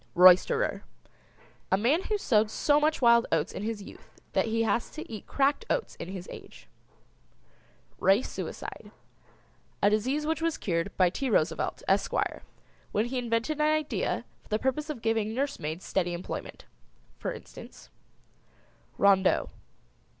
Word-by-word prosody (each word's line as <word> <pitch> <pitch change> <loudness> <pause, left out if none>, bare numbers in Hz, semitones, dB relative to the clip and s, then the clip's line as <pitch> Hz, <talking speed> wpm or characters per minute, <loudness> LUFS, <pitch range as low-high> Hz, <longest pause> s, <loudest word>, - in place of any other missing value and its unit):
ROYSTERER. 185 - +5 0.9
A 190 - +5
man 260 - +2
who 425 - 0
sowed 220 - +2
so 290 +6 +2
much 305 -2 +1
wild 235 0 +6
oats - - +1
in - - -5
his 215 -1 -3
youth - - -15
that - - +2
he 225 0 +1
has 230 +1 0
to 310 - -8
eat 215 -4 -8
cracked 280 +8 +1
oats - - -1
in - - -6
his 185 -1 -7
age. - - -12 1.3
RACE 195 +6 +3
SUICIDE. - - -7 0.9
A 205 - +6
disease 260 +8 0
which 320 +1 -1
was 330 -1 0
cured 170 0 -1
by 180 -2 +4
T. 270 +6 -2
Roosevelt, 165 -7 0
Esquire, - - 0 0.5
when 210 +2 +1
he 255 +1 -2
invented 240 +5 -1
an 300 - +4
idea 310 -1 -1 0.2
for - - -24
the 215 - +1
purpose 265 +6 -1
of 265 -7 -5
giving 225 -1 0
nursemaids 185 - -3
steady 175 -2 0
employment. 175 +1 -6 0.5
For - - -2
instance: - - -11 1.1
Rondeau. 195 -1 +3
230 Hz, 145 wpm, -28 LUFS, 200-290 Hz, 1.3 s, wild